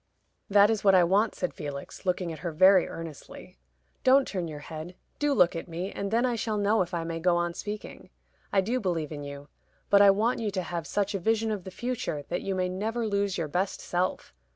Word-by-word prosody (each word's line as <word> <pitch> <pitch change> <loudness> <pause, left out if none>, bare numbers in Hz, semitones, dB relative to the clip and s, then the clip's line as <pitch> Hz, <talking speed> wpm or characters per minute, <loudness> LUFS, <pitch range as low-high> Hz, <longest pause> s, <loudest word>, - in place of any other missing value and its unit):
"That 205 +1 +6
is 220 -3 -1
what 195 -2 +6
I 180 - +6
want," 200 +5 +2
said 180 - -3
Felix, 145 +3 -7
looking 180 -2 0
at 155 - -9
her 170 -2 -3
very 185 +3 +6
earnestly. 165 - -9 0.5
"Don't 265 +1 +5
turn 180 -4 -3
your 150 -2 -7
head. 160 +3 -8 0.2
Do 295 0 +1
look 180 -11 +4
at 165 - -5
me, 175 +3 -4
and 200 - -4
then 230 +4 +2
I 245 -2 0
shall 220 -1 -2
know 205 +1 +2
if 175 -1 -2
I 170 -2 -2
may 165 0 -4
go 175 +1 +2
on 175 0 -1
speaking. 210 +4 -7 0.4
I 195 - +4
do 235 +7 -1
believe 170 - -2
in 150 -2 -6
you; 140 0 -8 0.4
but 200 0 +7
I 200 - +8
want 215 +5 +2
you 220 -2 -1
to 190 -2 -2
have 170 -1 -4
such 205 0 -1
a 195 - -1
vision 225 +3 +1
of 205 -4 -4
the - - -5
future 225 -8 -3
that 175 - -2
you 195 - -2
may 185 -1 0
never 220 +6 -2
lose 200 -2 0
your 165 -3 -2
best 180 +6 -1
self. 180 +1 -2
185 Hz, 230 wpm, -28 LUFS, 170-210 Hz, 0.5 s, I